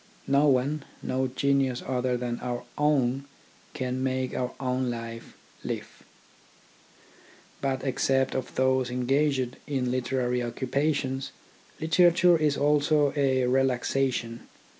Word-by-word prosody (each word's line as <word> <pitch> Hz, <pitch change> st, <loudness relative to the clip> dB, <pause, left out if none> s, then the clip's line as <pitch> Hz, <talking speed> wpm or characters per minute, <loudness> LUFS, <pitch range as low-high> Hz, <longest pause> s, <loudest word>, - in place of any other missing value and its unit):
No 140 Hz, +2 st, +3 dB
one, 140 Hz, +2 st, +1 dB, 0.2 s
no 130 Hz, 0 st, 0 dB
genius 135 Hz, -1 st, 0 dB
other 125 Hz, -1 st, 0 dB
than 120 Hz, -1 st, -3 dB
our 120 Hz, -1 st, -4 dB
own, 140 Hz, -3 st, +1 dB, 0.5 s
can 130 Hz, 0 st, -2 dB
make 130 Hz, -1 st, -1 dB
our 125 Hz, 0 st, -1 dB
own 130 Hz, -1 st, -1 dB
life 115 Hz, -1 st, -7 dB, 0.3 s
live. -, -, -6 dB, 1.6 s
But 135 Hz, -1 st, -1 dB
except 135 Hz, 0 st, +1 dB
for 130 Hz, -1 st, -4 dB
those 130 Hz, -1 st, +2 dB
engaged 130 Hz, +1 st, 0 dB
in 130 Hz, -4 st, -1 dB
literary 125 Hz, -1 st, 0 dB
occupa 130 Hz, +5 st, 0 dB
tions, 135 Hz, -1 st, -3 dB, 0.5 s
literature 175 Hz, +2 st, +5 dB
is 150 Hz, -3 st, +1 dB
also 145 Hz, 0 st, +3 dB
a 130 Hz, -3 st, +2 dB
relaxation. 125 Hz, -2 st, 0 dB
130 Hz, 115 wpm, -27 LUFS, 125-140 Hz, 1.6 s, literature